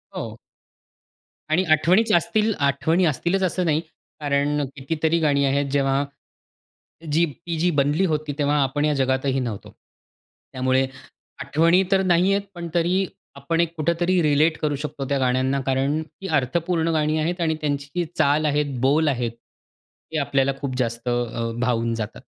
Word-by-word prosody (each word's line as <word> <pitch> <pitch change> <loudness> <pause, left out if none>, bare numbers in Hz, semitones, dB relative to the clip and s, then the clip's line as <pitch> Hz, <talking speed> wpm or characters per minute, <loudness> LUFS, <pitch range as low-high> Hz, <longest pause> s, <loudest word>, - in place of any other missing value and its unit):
हो. - - -5 1.1
आणि 165 +4 +3
आठवणीच 180 +9 +4
असतील 215 +4 +1
आठवणी 150 +6 +2
असतीलच 175 +5 0
असं 180 0 0
नाही. 155 0 +2 0.4
कारण 145 0 0
कितीतरी 160 +4 0
गाणी 140 -3 +2
आहेत 140 +1 +1
जेव्हा 140 0 +2 1.1
जी 165 +3 +3
ती 165 +2 -6
जी 180 - +2
बनली 145 +7 +2
होती 155 -3 -1
तेव्हा 145 0 +2
आपण 145 +3 0
या 150 - +2
जगातही 130 0 +1
नव्हतो. 115 -6 -5 0.8
त्यामुळे 130 +1 +1 0.6
आठवणी 170 +4 +3
तर 195 -1 +4
नाही 180 +1 +3
आहेत, 200 0 0
पण 170 -1 -5
तरी 180 +3 +2 0.3
आपण 150 +4 0
एक 170 0 -2
कुठेतरी 170 +3 +1
रिलेट 155 +1 +3
करू 150 -1 0
शकतो 145 -2 -5
त्या 140 - +1
गाण्यांना, 130 +1 +1
कारण 135 +4 0
ती 155 +5 -10
अर्थपूर्ण 165 +5 0
गाणी 155 0 +1
आहेत 175 +3 -1
आणि 160 -1 +1
त्यांची 145 +3 -2
चाल 150 +2 +3
आहे, 150 0 +2 0.2
बोल 150 +4 +3
आहेत 120 -4 0 0.8
हे - - 0
आपल्याला 140 -1 +1
खूप 135 -3 -3
जास्त 120 -1 -2
अ, 120 -1 -2
भावून 115 -2 0
जातात. 110 -1 -5
150 Hz, 150 wpm, -23 LUFS, 135-170 Hz, 1.1 s, आठवणीच